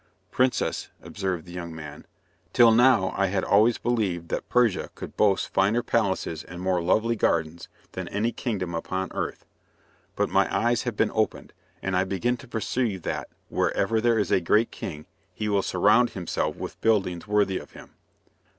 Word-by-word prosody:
"Princess," 125 Hz, 0 st, 0 dB
observed 95 Hz, -4 st, -3 dB
the 90 Hz, -, -12 dB
young 85 Hz, -2 st, -6 dB
man, 75 Hz, -2 st, -9 dB, 0.5 s
"till 120 Hz, -2 st, +7 dB
now 120 Hz, -5 st, +4 dB
I 100 Hz, -, +2 dB
had 95 Hz, 0 st, -1 dB
always 110 Hz, +4 st, +4 dB
believed 100 Hz, -8 st, -1 dB
that -, -, -3 dB
Persia 120 Hz, -5 st, +2 dB
could -, -, -8 dB
boast 100 Hz, -3 st, +2 dB
finer 105 Hz, +5 st, +2 dB
palaces 95 Hz, -7 st, -1 dB
and 90 Hz, 0 st, -10 dB
more 90 Hz, -1 st, 0 dB
lovely 110 Hz, +7 st, +2 dB
gardens 85 Hz, -5 st, -1 dB, 0.2 s
than -, -, -5 dB
any 110 Hz, +4 st, -1 dB
kingdom 95 Hz, -10 st, -3 dB
upon 95 Hz, +3 st, -3 dB
earth. -, -, -4 dB, 0.7 s
But -, -, +1 dB
my -, -, +2 dB
eyes 120 Hz, 0 st, +1 dB
have 110 Hz, -, -9 dB
been -, -, +2 dB
opened, 110 Hz, -1 st, -1 dB, 0.3 s
and 95 Hz, 0 st, -1 dB
I 90 Hz, +1 st, +2 dB
begin 105 Hz, +6 st, 0 dB
to 130 Hz, -, -13 dB
perceive 110 Hz, -4 st, -2 dB
that, -, -, -3 dB, 0.2 s
wherever 110 Hz, +3 st, +1 dB
there 120 Hz, -1 st, +3 dB
is 105 Hz, -, 0 dB
a 95 Hz, -, +3 dB
great 105 Hz, +7 st, +2 dB
king 75 Hz, -4 st, -7 dB, 0.3 s
he 105 Hz, +3 st, -3 dB
will 100 Hz, -1 st, +2 dB
surround 105 Hz, +7 st, +3 dB
himself 90 Hz, -4 st, -2 dB
with -, -, -8 dB
buildings 95 Hz, -5 st, +1 dB
worthy 100 Hz, -2 st, +1 dB
of -, -, -14 dB
him." -, -, -13 dB
100 Hz, 170 wpm, -26 LUFS, 90-115 Hz, 0.7 s, till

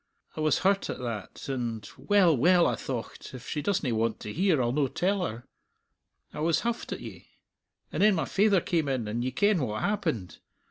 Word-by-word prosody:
I -, -, -6 dB
was 155 Hz, 0 st, +3 dB
hurt 195 Hz, 0 st, +2 dB
at -, -, -3 dB
that, 115 Hz, -5 st, -6 dB
and 120 Hz, -6 st, -3 dB
'Well, 195 Hz, -6 st, +4 dB
well,' 175 Hz, +7 st, +5 dB
I -, -, +2 dB
thocht, 125 Hz, 0 st, -6 dB
'if 125 Hz, -, -10 dB
she 150 Hz, -, -2 dB
doesna 180 Hz, -9 st, 0 dB
want 110 Hz, 0 st, 0 dB
to 105 Hz, -, -6 dB
hear, 180 Hz, -3 st, +2 dB
I'll 120 Hz, -1 st, +1 dB
no 140 Hz, +1 st, +1 dB
tell 190 Hz, +7 st, 0 dB
her.' 115 Hz, -6 st, -5 dB, 0.9 s
I -, -, -6 dB
was 160 Hz, +1 st, +2 dB
huffed 235 Hz, 0 st, -3 dB
at -, -, -4 dB
ye. -, -, -10 dB, 0.6 s
And -, -, -2 dB
then 210 Hz, -1 st, +5 dB
my 165 Hz, -, 0 dB
faither 200 Hz, -2 st, +3 dB
came 160 Hz, -5 st, 0 dB
in, 125 Hz, -5 st, -1 dB
and 115 Hz, +3 st, -2 dB
ye 130 Hz, -, 0 dB
ken 200 Hz, -, +2 dB
what 110 Hz, -4 st, -2 dB
happened. 160 Hz, -, -2 dB
150 Hz, 200 wpm, -28 LUFS, 120-190 Hz, 0.9 s, well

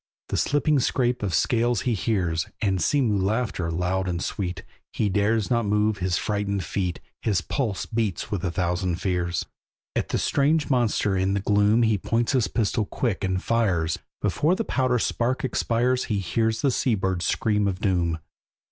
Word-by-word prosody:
The -, -, -1 dB
slipping 145 Hz, 0 st, +2 dB
scrape 125 Hz, 0 st, +1 dB
of 100 Hz, -3 st, -1 dB
scales 120 Hz, +7 st, +2 dB
he 125 Hz, -2 st, 0 dB
hears, 90 Hz, -7 st, 0 dB
And 95 Hz, -4 st, 0 dB
sea 145 Hz, -, +2 dB
mew 105 Hz, -6 st, +1 dB
laughter, 105 Hz, -4 st, -1 dB
loud 90 Hz, +3 st, -1 dB
and 85 Hz, -2 st, -1 dB
sweet; 90 Hz, -1 st, -3 dB, 0.3 s
He 105 Hz, -, 0 dB
dares 105 Hz, +2 st, +1 dB
not 120 Hz, -1 st, +2 dB
move 105 Hz, 0 st, +1 dB
his 90 Hz, -1 st, 0 dB
frightened 100 Hz, -2 st, -1 dB
feet, 90 Hz, +2 st, -2 dB, 0.2 s
His 100 Hz, -5 st, +1 dB
pulse 110 Hz, -, -2 dB
beats 110 Hz, -5 st, -2 dB
with 100 Hz, -3 st, -2 dB
a 90 Hz, -, 0 dB
thousand 90 Hz, 0 st, -1 dB
fears. 90 Hz, -3 st, -1 dB, 0.5 s
At -, -, -1 dB
that -, -, 0 dB
strange 150 Hz, +2 st, +1 dB
monster 115 Hz, -5 st, +2 dB
in 95 Hz, +1 st, +1 dB
the -, -, +1 dB
gloom 105 Hz, +3 st, +3 dB
He 110 Hz, -3 st, +2 dB
points 115 Hz, +4 st, 0 dB
his 130 Hz, -5 st, +2 dB
pistol 110 Hz, -1 st, 0 dB
quick, 115 Hz, -6 st, -2 dB
and 95 Hz, -1 st, -1 dB
fires; 95 Hz, -9 st, +1 dB, 0.2 s
Before 160 Hz, +5 st, +2 dB
the 225 Hz, +2 st, -2 dB
powder 130 Hz, -2 st, +1 dB
spark 125 Hz, +4 st, 0 dB
expires 125 Hz, 0 st, +1 dB
He 105 Hz, -, -1 dB
hears 110 Hz, -, 0 dB
a 140 Hz, -, +4 dB
sea 125 Hz, -1 st, +1 dB
bird's 95 Hz, -2 st, -1 dB
scream 105 Hz, -2 st, +1 dB
of 95 Hz, -2 st, -2 dB
doom. 90 Hz, -5 st, +1 dB
105 Hz, 175 wpm, -25 LUFS, 95-120 Hz, 0.5 s, a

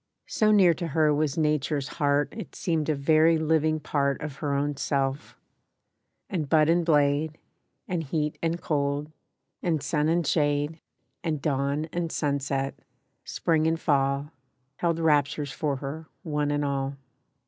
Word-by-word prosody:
So 215 Hz, -1 st, +2 dB
near 190 Hz, -5 st, +6 dB
to 170 Hz, 0 st, -4 dB
her 155 Hz, -1 st, +3 dB
was 150 Hz, 0 st, 0 dB
Nature's 150 Hz, -2 st, 0 dB
heart 145 Hz, -1 st, +2 dB
It 215 Hz, -7 st, -8 dB
seemed 160 Hz, -3 st, -1 dB
a 155 Hz, -, +2 dB
very 155 Hz, +3 st, +4 dB
living 155 Hz, 0 st, +1 dB
part 140 Hz, -2 st, 0 dB
Of 150 Hz, -2 st, -6 dB
her 145 Hz, -2 st, -1 dB
own 145 Hz, +1 st, 0 dB
self; 135 Hz, 0 st, -2 dB, 0.9 s
and 160 Hz, -7 st, -3 dB
bud 155 Hz, 0 st, +4 dB
and 170 Hz, +1 st, +3 dB
blade, 150 Hz, 0 st, +2 dB, 0.5 s
And 175 Hz, -3 st, -1 dB
heat 150 Hz, 0 st, -2 dB
and 165 Hz, +1 st, -1 dB
cold, 145 Hz, -1 st, -1 dB, 0.5 s
and 160 Hz, -5 st, 0 dB
sun 150 Hz, 0 st, +1 dB
and 170 Hz, 0 st, +1 dB
shade, 145 Hz, +1 st, +1 dB, 0.4 s
And 155 Hz, -3 st, -1 dB
dawn 140 Hz, +1 st, 0 dB
and 170 Hz, -2 st, -2 dB
sunset, 140 Hz, -2 st, -1 dB, 0.5 s
Spring 160 Hz, -1 st, +1 dB
and 165 Hz, 0 st, +1 dB
Fall, 140 Hz, 0 st, +1 dB, 0.5 s
Held 170 Hz, -1 st, 0 dB
raptures 150 Hz, -3 st, +1 dB
for 145 Hz, -1 st, -1 dB
her, 145 Hz, +4 st, -6 dB, 0.2 s
one 150 Hz, -3 st, -1 dB
and 145 Hz, 0 st, 0 dB
all. 140 Hz, 0 st, -2 dB
150 Hz, 150 wpm, -27 LUFS, 140-160 Hz, 0.9 s, near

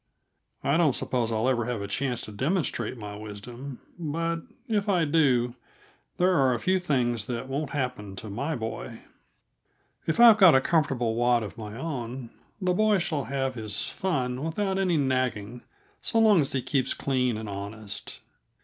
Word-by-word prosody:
I 140 Hz, +3 st, +2 dB
don't 155 Hz, -7 st, +3 dB
suppose 120 Hz, -3 st, -1 dB
I'll 110 Hz, +2 st, +1 dB
ever 120 Hz, -3 st, +1 dB
have 120 Hz, -2 st, -2 dB
a -, -, -4 dB
chance 125 Hz, +3 st, -1 dB
to -, -, -7 dB
demonstrate 140 Hz, -, -1 dB
my 105 Hz, -2 st, -7 dB
wisdom, 120 Hz, +6 st, -8 dB, 0.2 s
but, 165 Hz, +1 st, -1 dB, 0.3 s
if 210 Hz, -2 st, 0 dB
I 175 Hz, -4 st, +3 dB
do, 135 Hz, -6 st, +3 dB, 0.6 s
there 185 Hz, +1 st, +3 dB
are 135 Hz, -6 st, +3 dB
a -, -, -3 dB
few 185 Hz, +6 st, +2 dB
things 120 Hz, -, 0 dB
that 125 Hz, +1 st, -3 dB
won't 140 Hz, +2 st, -2 dB
happen 125 Hz, -8 st, -3 dB
to 110 Hz, -, -7 dB
my 140 Hz, +10 st, -2 dB
boy. 110 Hz, -1 st, -5 dB, 1.1 s
If 160 Hz, -, 0 dB
I've 230 Hz, -2 st, +9 dB
got 185 Hz, -7 st, +8 dB
a -, -, +7 dB
comfortable 130 Hz, -6 st, +1 dB
wad 120 Hz, 0 st, +2 dB
of 105 Hz, -, -7 dB
my 110 Hz, -1 st, -7 dB
own, 130 Hz, -4 st, -5 dB, 0.3 s
the 185 Hz, -2 st, +1 dB
boy 215 Hz, +2 st, +3 dB
shall 155 Hz, -7 st, -1 dB
have 135 Hz, +1 st, -1 dB
his 110 Hz, -4 st, -2 dB
fun 130 Hz, -8 st, -1 dB
without 190 Hz, +4 st, -1 dB
any 180 Hz, -4 st, +2 dB
nagging, 125 Hz, -4 st, -1 dB, 0.4 s
so 230 Hz, -, -1 dB
long 215 Hz, -6 st, +6 dB
as 135 Hz, -, 0 dB
he 130 Hz, -2 st, 0 dB
keeps 130 Hz, +1 st, 0 dB
clean 125 Hz, -4 st, 0 dB
and 110 Hz, 0 st, -6 dB
honest. 100 Hz, +1 st, -7 dB
130 Hz, 170 wpm, -27 LUFS, 115-165 Hz, 1.1 s, I've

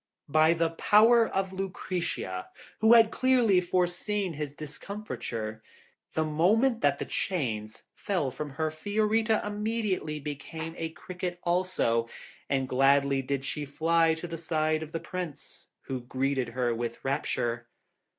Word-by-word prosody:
By 155 Hz, +2 st, +5 dB
the 165 Hz, 0 st, +1 dB
power 225 Hz, +6 st, +5 dB
of 190 Hz, 0 st, -2 dB
Lucretia, 180 Hz, -, -3 dB, 0.3 s
who 220 Hz, +2 st, +6 dB
had 225 Hz, -1 st, +7 dB
clearly 245 Hz, -8 st, +4 dB
foreseen 180 Hz, +2 st, -1 dB
his 145 Hz, -1 st, -5 dB
discomforture, 145 Hz, -, -6 dB, 0.5 s
the 160 Hz, -, +2 dB
moment 215 Hz, -, +2 dB
that 140 Hz, -1 st, +3 dB
the -, -, -4 dB
chains 110 Hz, -, -3 dB
fell 175 Hz, -10 st, -1 dB
from 150 Hz, +3 st, -5 dB
her 155 Hz, +2 st, -1 dB
Fiorita 215 Hz, +6 st, +1 dB
immediately 210 Hz, -7 st, -2 dB
became 160 Hz, +3 st, -6 dB
a 165 Hz, -, -2 dB
cricket 180 Hz, +1 st, -6 dB
also, 170 Hz, -11 st, +1 dB, 0.4 s
and 135 Hz, -1 st, +1 dB
gladly 140 Hz, +1 st, +3 dB
did 135 Hz, 0 st, -3 dB
she 150 Hz, -, -3 dB
fly 165 Hz, +3 st, +2 dB
to 160 Hz, -, -7 dB
the 165 Hz, -1 st, -5 dB
side 155 Hz, -1 st, 0 dB
of 160 Hz, -1 st, -7 dB
the 165 Hz, -, -3 dB
Prince, 175 Hz, -5 st, -7 dB
who 130 Hz, -2 st, -4 dB
greeted 130 Hz, +1 st, -1 dB
her 120 Hz, 0 st, 0 dB
with 115 Hz, +1 st, -4 dB
rapture. 120 Hz, -4 st, -1 dB
160 Hz, 135 wpm, -29 LUFS, 140-190 Hz, 0.5 s, had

